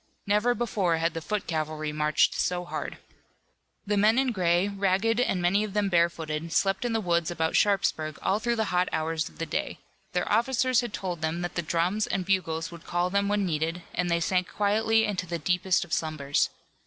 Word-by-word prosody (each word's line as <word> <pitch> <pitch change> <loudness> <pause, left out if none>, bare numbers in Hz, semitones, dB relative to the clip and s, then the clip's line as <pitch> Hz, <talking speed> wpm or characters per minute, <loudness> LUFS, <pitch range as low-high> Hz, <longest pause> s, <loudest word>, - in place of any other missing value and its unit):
Never 210 +4 +2
before 195 -8 0
had 165 0 0
the 165 - -4
foot 210 +4 -3
cavalry 155 -1 -2
marched 150 0 +2
so 180 0 -1
hard. - - -5 0.9
The 205 0 0
men 215 +3 +4
in 265 -1 +2
gray, 180 -2 +2
ragged 200 +3 +1
and 220 -7 +1
many 180 +4 +2
of 210 -2 -5
them 205 -1 +1
barefooted, 165 -2 0
slept 195 +6 +1
in 240 - 0
the 225 - +1
woods 170 -4 +1
about 160 -2 -1
Sharpsburg 160 -6 +1
all 200 - +1
through 235 +1 0
the 220 -4 -1
hot 180 +1 +2
hours 160 -1 -1
of 80 - -20
the - - -3
day. - - -3 0.4
Their 180 - 0
officers 255 +3 +2
had 240 - -5
told 180 -5 -4
them 160 +2 -1
that 175 - -3
the 170 - -1
drums 175 +6 0
and 185 -2 -2
bugles 165 -4 -1
would 170 -1 -11
call 175 +1 0
them 200 +1 +1
when 205 -1 +1
needed, 165 +1 -2
and 180 -1 -1
they 170 0 +2
sank 180 +2 0
quietly 220 +2 +2
into 190 -4 -2
the 170 0 -2
deepest 180 +3 +1
of 170 - -8
slumbers. 150 -3 0
180 Hz, 205 wpm, -27 LUFS, 165-205 Hz, 0.9 s, men